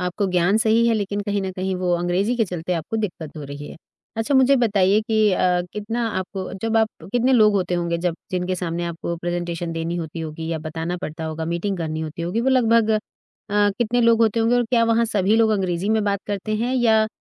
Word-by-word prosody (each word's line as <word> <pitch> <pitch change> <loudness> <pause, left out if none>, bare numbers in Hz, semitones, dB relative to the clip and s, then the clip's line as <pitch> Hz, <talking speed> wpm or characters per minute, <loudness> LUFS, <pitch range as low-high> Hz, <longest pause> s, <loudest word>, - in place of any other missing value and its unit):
आपको 180 +3 -1
ज्ञान 180 +3 +3
सही 225 +1 +3
है 230 - +3
लेकिन 205 -1 -2
कहीं 205 0 0
न 190 - -3
कहीं 185 +1 -2
वो 180 -1 0
अंग्रेज़ी 180 +7 0
के 230 - +2
चलते 180 -2 -4
आपको 170 +6 -3
दिक्कत 175 -8 -4
हो 150 - -6
रही 145 +1 -8
है। - - -10 0.4
अच्छा, 225 +6 0
मुझे 265 +1 +5
बताइए 205 -4 +3
कि 220 -1 +2
अ, 180 -1 +2
कितना 225 +3 -2
आपको 190 0 -5
जब 225 0 0
आप 220 -1 +3 0.2
कितने 245 +2 +2
लोग 215 -4 +5
होते 180 -3 0
होंगे 170 -1 -1
जब 175 -2 +1 0.2
जिनके 185 0 -1
सामने 175 -1 -3
आपको 170 0 -4
प्रेज़ेंटेशन 175 0 -3
देनी 165 +1 -3
होती 165 -1 -5
होगी 160 0 -5
या 160 - -2
बताना 160 +3 -4
पड़ता 160 +1 -5
होगा, 160 0 -4
मीटिंग 170 +4 -2
करनी 155 -1 -3
होती 160 +1 -5
होगी, 180 +7 -1
वो 250 - +1
लगभग 230 -3 +3
अ, 215 - +3 0.8
कितने 240 +1 +1
लोग 230 -1 +4
होते 225 0 +2
होंगे 225 +2 +3
और 245 - +2
क्या 230 0 +2
वहाँ 230 0 +3
सभी 210 -1 +1
लोग 225 -1 +4
अंग्रेज़ी 190 -2 -1
में 220 0 +2
बात 200 -1 0
करते 205 +1 -3
हैं 240 +4 -1
या 220 -3 +3
195 Hz, 225 wpm, -22 LUFS, 170-225 Hz, 0.8 s, मुझे